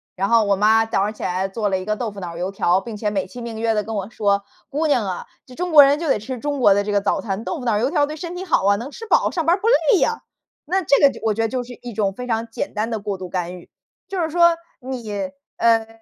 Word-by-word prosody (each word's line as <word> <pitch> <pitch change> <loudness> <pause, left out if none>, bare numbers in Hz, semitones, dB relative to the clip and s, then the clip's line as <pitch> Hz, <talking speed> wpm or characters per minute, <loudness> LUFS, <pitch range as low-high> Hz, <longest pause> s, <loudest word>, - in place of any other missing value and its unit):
然 195 +1 -1
后 230 -2 +4
我 200 - +3
妈 215 +3 +4
早 225 -3 0
上 210 +1 -2
起 - - -14
来 185 +2 -1
做 205 +2 -2
了 190 - +1
一 185 - -6
个 215 0 0
豆 230 0 -3
腐 200 - -9
脑 170 -3 -6
油 180 +2 -2
条， 190 -1 +2
并 225 -1 -7
且 210 0 -1
美 195 -2 -2
其 245 +6 -10
名 230 -2 -6
曰 225 -1 +1
的 210 - 0
跟 225 - -6
我 200 +1 -3
说： 200 -3 +1 0.3
“姑 300 +2 0
娘 255 -7 +2
啊， 185 -2 -4 0.2
这 255 - -14
中 355 +4 -3
国 295 -2 +10
人 280 +2 +3
就 335 - -3
得 - - +3
吃 250 +4 -6
中 290 +2 -2
国 205 -5 +6
的 205 +1 +1
这 205 - -3
个 205 - +3
早 - - 0
餐， 200 0 -4
豆 325 +5 -4
腐 250 - -7
脑 220 -3 +2
油 255 +7 0
条 290 -4 +2
对 305 - -6
身 340 +3 -6
体 365 - -5
好 360 - +1
啊， 200 0 +5
能 240 +5 -6
吃 455 +10 -9
饱 - - +3
上 330 -4 -2
班 340 - +4
儿 380 - -10
不 440 - 0
累 480 -3 +4
呀。” 455 0 0 0.4
那 375 +5 +1
这 285 -4 +3
个， 280 - +7
就 - - -11
我 220 -2 +1
觉 225 - 0
得 - - +2
就 250 0 -2
是 245 - -10
一 240 -1 -6
种 200 -2 0
非 250 - -6
常 230 0 -1
简 225 - -5
单 215 +2 -1
的 225 - -2
过 200 -1 -4
度 185 - -7
干 180 0 -3
预。 175 - -15 0.4
就 385 -2 -4
是 320 - 0
说 340 0 +5 0.2
你 225 -7 -4 0.3
呃， 225 -1 +3
225 Hz, 330 characters per minute, -21 LUFS, 200-285 Hz, 0.4 s, 国